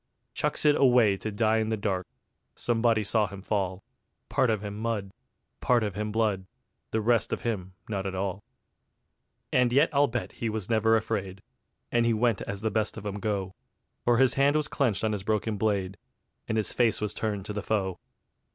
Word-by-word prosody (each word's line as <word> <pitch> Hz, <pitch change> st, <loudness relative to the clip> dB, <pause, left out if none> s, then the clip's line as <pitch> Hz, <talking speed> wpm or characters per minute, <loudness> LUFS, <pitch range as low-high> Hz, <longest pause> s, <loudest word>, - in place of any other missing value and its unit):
Chucks -, -, 0 dB
it 150 Hz, -1 st, +6 dB
away 120 Hz, -6 st, +5 dB
to 110 Hz, -, -4 dB
die 110 Hz, +1 st, +2 dB
in 110 Hz, 0 st, 0 dB
the 110 Hz, -, 0 dB
dark: 95 Hz, -3 st, -2 dB, 0.5 s
Somebody 115 Hz, -2 st, +1 dB
saw 105 Hz, +1 st, +2 dB
him 95 Hz, 0 st, -10 dB
fall, 95 Hz, -3 st, -1 dB, 0.5 s
Part 130 Hz, -, +2 dB
of 110 Hz, -2 st, +1 dB
him 100 Hz, -1 st, -5 dB
mud, 105 Hz, -3 st, -2 dB, 0.5 s
part 120 Hz, -2 st, +3 dB
of 105 Hz, -2 st, -2 dB
him 105 Hz, +2 st, -3 dB
blood, 105 Hz, -4 st, 0 dB, 0.4 s
The 110 Hz, -, 0 dB
rest 115 Hz, +1 st, +2 dB
of -, -, -2 dB
him 95 Hz, -6 st, -3 dB
not 100 Hz, -3 st, -2 dB
at 95 Hz, -, -4 dB
all. 95 Hz, +1 st, -3 dB, 1.1 s
And 125 Hz, -1 st, +4 dB
yet 140 Hz, +6 st, +4 dB
I'll 145 Hz, +1 st, +4 dB
bet 120 Hz, -2 st, -3 dB
he 115 Hz, -, -3 dB
was 110 Hz, -1 st, -3 dB
never 110 Hz, 0 st, +4 dB
afraid, 100 Hz, -4 st, -3 dB, 0.5 s
And 120 Hz, -1 st, +3 dB
he 115 Hz, -1 st, +2 dB
went 115 Hz, -2 st, +1 dB
as 100 Hz, 0 st, -4 dB
the 110 Hz, -1 st, 0 dB
best 110 Hz, +1 st, -1 dB
of 110 Hz, -, -8 dB
'em 100 Hz, 0 st, -3 dB
go, 100 Hz, -2 st, -2 dB, 0.5 s
For 120 Hz, -1 st, +3 dB
his 130 Hz, 0 st, +4 dB
hand 140 Hz, +2 st, +3 dB
was 155 Hz, -1 st, +1 dB
clenched 120 Hz, -10 st, 0 dB
on 110 Hz, -, +2 dB
his 105 Hz, -2 st, -2 dB
broken 110 Hz, +2 st, 0 dB
blade, 100 Hz, -2 st, -1 dB, 0.5 s
And 110 Hz, -, -1 dB
his 110 Hz, -, 0 dB
face 115 Hz, -3 st, +2 dB
was 105 Hz, 0 st, -2 dB
turned 105 Hz, -3 st, -3 dB
to 105 Hz, -, -5 dB
the 105 Hz, -, -3 dB
foe. 95 Hz, -4 st, -1 dB
110 Hz, 195 wpm, -28 LUFS, 100-115 Hz, 1.1 s, it